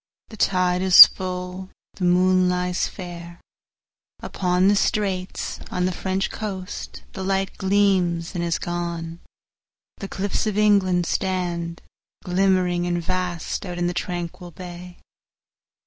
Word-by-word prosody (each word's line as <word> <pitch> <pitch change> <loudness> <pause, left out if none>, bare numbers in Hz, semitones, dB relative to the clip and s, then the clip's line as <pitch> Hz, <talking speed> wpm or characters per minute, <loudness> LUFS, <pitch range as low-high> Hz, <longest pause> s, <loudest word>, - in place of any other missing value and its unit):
The 220 - -11
tide 180 -2 +1
is 185 -1 +11
full, 185 0 -6 0.2
the 185 - -3
moon 185 +1 +3
lies 180 0 -1
fairUpon 180 +1 -5
the 205 - +4
straits;—on 185 -2 -2
the 185 - 0
French 190 +1 -2
coast 195 -3 -6
the 190 - -5
lightGleams 190 -2 0
and 175 -2 -2
is 170 -1 0
gone; 170 -1 -4 0.8
the 195 - -6
cliffs 200 +3 -2
of 210 -1 -2
England 195 -4 +3
stand, 175 -2 -2 0.4
Glimmering 180 -1 +1
and 175 0 0
vast, 180 -1 -3
out 180 -2 -6
in 175 - -1
the 175 - -1
tranquil 175 0 -5
bay. 180 0 -10
180 Hz, 115 wpm, -23 LUFS, 175-190 Hz, 0.8 s, is